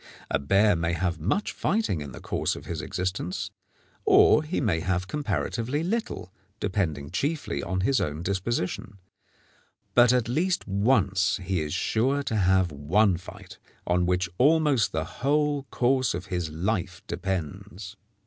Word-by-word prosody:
A -, -, +2 dB
bear 100 Hz, +8 st, +3 dB
may 85 Hz, +1 st, -1 dB
have 85 Hz, 0 st, -1 dB
much 105 Hz, -, 0 dB
fighting 200 Hz, -, 0 dB
in 70 Hz, -2 st, -7 dB
the -, -, -9 dB
course -, -, -1 dB
of -, -, -10 dB
his -, -, -4 dB
existence, 90 Hz, 0 st, -3 dB, 0.5 s
or -, -, +6 dB
he 155 Hz, +3 st, -2 dB
may 105 Hz, -11 st, +1 dB
have 90 Hz, +1 st, -1 dB
comparatively 115 Hz, -, -2 dB
little, 190 Hz, -, -3 dB, 0.3 s
depending 80 Hz, -8 st, -2 dB
chiefly 140 Hz, -, -2 dB
on 95 Hz, +4 st, -2 dB
his 130 Hz, +6 st, +2 dB
own 75 Hz, +2 st, -3 dB
disposition; 100 Hz, 0 st, -2 dB, 1.0 s
but 120 Hz, -1 st, +6 dB
at 125 Hz, -3 st, +2 dB
least 170 Hz, +9 st, 0 dB
once 100 Hz, -3 st, +2 dB
he 90 Hz, -2 st, -1 dB
is 75 Hz, -1 st, -4 dB
sure 135 Hz, +6 st, +1 dB
to 115 Hz, -, -2 dB
have 95 Hz, -3 st, +3 dB
one 90 Hz, +8 st, +2 dB
fight 90 Hz, +2 st, -11 dB, 0.3 s
on 90 Hz, 0 st, +1 dB
which 90 Hz, 0 st, +1 dB
almost 150 Hz, -, +4 dB
the 80 Hz, 0 st, -2 dB
whole 145 Hz, -, 0 dB
course 130 Hz, -3 st, +1 dB
of 90 Hz, +2 st, -5 dB
his 90 Hz, -3 st, -1 dB
life 90 Hz, +2 st, -2 dB
depends. 95 Hz, +2 st, -5 dB
95 Hz, 150 wpm, -26 LUFS, 90-125 Hz, 1.0 s, or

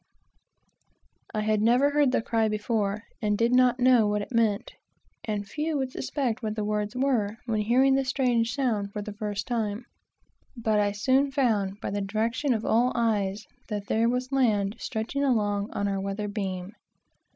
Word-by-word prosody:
I 215 Hz, -, -2 dB
had 215 Hz, 0 st, +1 dB
never 245 Hz, +6 st, +4 dB
heard 290 Hz, -2 st, +3 dB
the 240 Hz, -, +1 dB
cry 225 Hz, -1 st, +1 dB
before, 210 Hz, -1 st, -1 dB, 0.2 s
and 210 Hz, -2 st, +1 dB
did 235 Hz, +2 st, +2 dB
not 250 Hz, 0 st, +4 dB
know 245 Hz, -3 st, +5 dB
what 205 Hz, 0 st, 0 dB
it -, -, -11 dB
meant, 225 Hz, -4 st, +1 dB, 0.5 s
(and 205 Hz, -2 st, -3 dB
few 305 Hz, +6 st, -2 dB
would 265 Hz, -2 st, -2 dB
suspect 255 Hz, -5 st, -2 dB
what 215 Hz, -2 st, -3 dB
the 215 Hz, -, -2 dB
words 210 Hz, +1 st, -2 dB
were, 240 Hz, -6 st, 0 dB
when 220 Hz, -3 st, 0 dB
hearing 255 Hz, +5 st, +4 dB
the 270 Hz, 0 st, +2 dB
strange 250 Hz, -3 st, +1 dB
sound 215 Hz, -7 st, -1 dB
for 210 Hz, -, -4 dB
the 210 Hz, 0 st, -7 dB
first 205 Hz, -1 st, -4 dB
time,) 225 Hz, -1 st, -2 dB, 0.7 s
but 220 Hz, -2 st, +1 dB
I 205 Hz, 0 st, +2 dB
soon 260 Hz, +7 st, +2 dB
found, 215 Hz, -8 st, 0 dB
by -, -, -3 dB
the 205 Hz, 0 st, -2 dB
direction 225 Hz, +8 st, -1 dB
of 220 Hz, -, -3 dB
all 240 Hz, +3 st, +3 dB
eyes, 210 Hz, -4 st, 0 dB, 0.2 s
that 205 Hz, -3 st, -4 dB
there 225 Hz, +3 st, +2 dB
was 250 Hz, +2 st, -2 dB
land 215 Hz, -6 st, +2 dB
stretching 235 Hz, +5 st, -3 dB
along 205 Hz, -6 st, +1 dB
our 200 Hz, -1 st, -1 dB
weather 200 Hz, +2 st, -3 dB
beam. 190 Hz, -3 st, -4 dB
220 Hz, 175 wpm, -27 LUFS, 205-250 Hz, 0.7 s, know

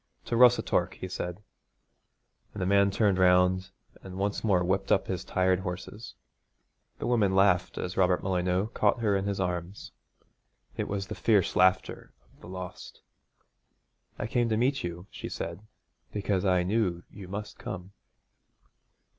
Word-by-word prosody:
'To 120 Hz, -, -2 dB
Rossatorc,' 125 Hz, 0 st, +4 dB
he 95 Hz, -, -6 dB
said, 90 Hz, +1 st, -5 dB, 1.1 s
and -, -, -6 dB
the -, -, 0 dB
man 100 Hz, +1 st, +4 dB
turned 100 Hz, -1 st, +2 dB
round 90 Hz, +1 st, +4 dB, 0.3 s
and 95 Hz, -1 st, -9 dB
once 100 Hz, +1 st, -2 dB
more 95 Hz, -5 st, +3 dB
whipped 95 Hz, +2 st, -1 dB
up -, -, +3 dB
his 95 Hz, -1 st, -3 dB
tired 95 Hz, 0 st, +1 dB
horses. 95 Hz, +4 st, -7 dB, 0.8 s
The -, -, -5 dB
woman 105 Hz, -6 st, +2 dB
laughed 95 Hz, -2 st, +3 dB
as 90 Hz, -, -4 dB
Robert 90 Hz, -1 st, +2 dB
Molyneux 90 Hz, +2 st, 0 dB
caught 120 Hz, -, +1 dB
her 105 Hz, -3 st, +2 dB
in 95 Hz, 0 st, -1 dB
his 100 Hz, -1 st, -2 dB
arms. 90 Hz, +1 st, -4 dB, 0.8 s
It -, -, -2 dB
was 100 Hz, -1 st, -3 dB
the -, -, -6 dB
fierce 105 Hz, -5 st, +2 dB
laughter 95 Hz, 0 st, +2 dB, 0.2 s
of -, -, -26 dB
the -, -, -11 dB
lost. 90 Hz, -1 st, -8 dB, 1.2 s
'I -, -, -3 dB
came 120 Hz, -1 st, 0 dB
to 110 Hz, -, +1 dB
meet 135 Hz, +4 st, +1 dB
you,' 85 Hz, +1 st, -5 dB
she -, -, -7 dB
said, 85 Hz, +3 st, -5 dB, 0.5 s
'because 100 Hz, -2 st, -1 dB
I 90 Hz, -1 st, +3 dB
knew 90 Hz, -3 st, 0 dB
you 95 Hz, -3 st, -10 dB
must 100 Hz, +3 st, -7 dB
come.' 95 Hz, +1 st, -7 dB
95 Hz, 155 wpm, -28 LUFS, 90-100 Hz, 1.2 s, Rossatorc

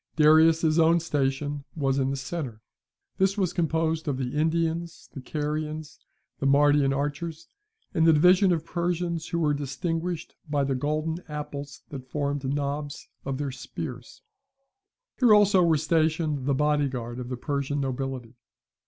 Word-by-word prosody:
Darius's 160 Hz, +1 st, +5 dB
own 165 Hz, +1 st, +5 dB
station 145 Hz, -2 st, -1 dB
was 135 Hz, -3 st, 0 dB
in 135 Hz, 0 st, +1 dB
the 135 Hz, -, -1 dB
centre. 135 Hz, -4 st, -5 dB, 0.6 s
This 190 Hz, +2 st, +2 dB
was 185 Hz, -3 st, 0 dB
composed 160 Hz, -1 st, 0 dB
of 140 Hz, -3 st, 0 dB
the 130 Hz, +1 st, -3 dB
Indians, 165 Hz, +2 st, -1 dB
the 135 Hz, -, -7 dB
Carians, 150 Hz, +2 st, -4 dB, 0.4 s
the 140 Hz, -, 0 dB
Mardian 145 Hz, 0 st, +4 dB
archers, 145 Hz, +4 st, -3 dB, 0.5 s
and 165 Hz, -3 st, +3 dB
the 165 Hz, -, +7 dB
division 180 Hz, +5 st, +5 dB
of 165 Hz, -2 st, 0 dB
Persians 170 Hz, -1 st, -2 dB
who 170 Hz, -, -2 dB
were 155 Hz, -3 st, +2 dB
distinguished 165 Hz, +5 st, -3 dB, 0.2 s
by 145 Hz, -1 st, +1 dB
the 135 Hz, 0 st, 0 dB
golden 155 Hz, +5 st, -1 dB
apples 145 Hz, -2 st, -6 dB
that 130 Hz, -3 st, -8 dB
formed 145 Hz, -1 st, -2 dB
knobs 145 Hz, 0 st, -3 dB, 0.2 s
of 135 Hz, -1 st, -2 dB
their 140 Hz, -1 st, -3 dB
spears. 135 Hz, -, -8 dB, 1.0 s
Here 240 Hz, -5 st, +7 dB
also 205 Hz, -2 st, +5 dB
were 165 Hz, -3 st, +4 dB
stationed 155 Hz, -2 st, 0 dB
the 140 Hz, -, +2 dB
body 150 Hz, 0 st, +2 dB
guard 120 Hz, -1 st, -5 dB
of 125 Hz, -1 st, -6 dB
the 125 Hz, -, -4 dB
Persian 140 Hz, +1 st, -2 dB
nobility. 130 Hz, -3 st, -3 dB
150 Hz, 150 wpm, -26 LUFS, 140-165 Hz, 1.0 s, the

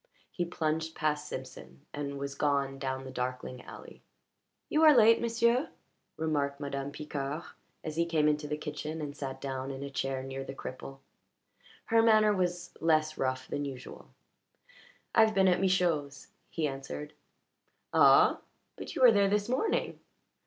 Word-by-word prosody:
He 175 Hz, -, -2 dB
plunged 160 Hz, -1 st, -2 dB
past 150 Hz, -1 st, -1 dB
Simpson 130 Hz, -, -9 dB
and 140 Hz, -1 st, -4 dB
was 140 Hz, 0 st, -4 dB
gone 140 Hz, -1 st, 0 dB
down 130 Hz, -1 st, -3 dB
the 130 Hz, -, -8 dB
darkling 125 Hz, 0 st, -4 dB
alley. -, -, -12 dB, 0.7 s
"You 305 Hz, -, +1 dB
are 305 Hz, -4 st, +8 dB
late, 230 Hz, 0 st, +6 dB
m'sieu'," 235 Hz, +3 st, +2 dB, 0.5 s
remarked 145 Hz, -3 st, -1 dB
Madame 140 Hz, -1 st, -4 dB
Picard 145 Hz, +1 st, -4 dB, 0.4 s
as 155 Hz, 0 st, -5 dB
he 170 Hz, 0 st, +2 dB
came 155 Hz, -3 st, +2 dB
into 150 Hz, 0 st, 0 dB
the 150 Hz, 0 st, -2 dB
kitchen 150 Hz, +1 st, -5 dB
and 145 Hz, -2 st, -5 dB
sat 135 Hz, -2 st, -5 dB
down 135 Hz, -1 st, -4 dB
in 135 Hz, 0 st, -6 dB
a 140 Hz, -, -6 dB
chair 135 Hz, -1 st, -2 dB
near 135 Hz, 0 st, -5 dB
the 135 Hz, -, -8 dB
cripple. 135 Hz, +1 st, -8 dB, 0.8 s
Her 225 Hz, -1 st, +4 dB
manner 215 Hz, -2 st, +5 dB
was 175 Hz, -1 st, -2 dB
less 155 Hz, -1 st, +2 dB
rough 130 Hz, -1 st, -1 dB
than 145 Hz, -, -3 dB
usual. 135 Hz, -3 st, -8 dB, 1.0 s
"I've 220 Hz, -1 st, +5 dB
been 190 Hz, -1 st, +4 dB
at 180 Hz, -1 st, +3 dB
Michaud's," 170 Hz, -7 st, 0 dB, 0.2 s
he 160 Hz, -2 st, -1 dB
answered. 140 Hz, +2 st, -6 dB, 0.8 s
"Ah? -, -, +6 dB, 0.4 s
But -, -, -7 dB
you -, -, +1 dB
were 245 Hz, -, +9 dB
there 200 Hz, -2 st, +3 dB
this 205 Hz, +1 st, +1 dB
morning." 260 Hz, -, -1 dB
150 Hz, 155 wpm, -30 LUFS, 135-180 Hz, 1.0 s, were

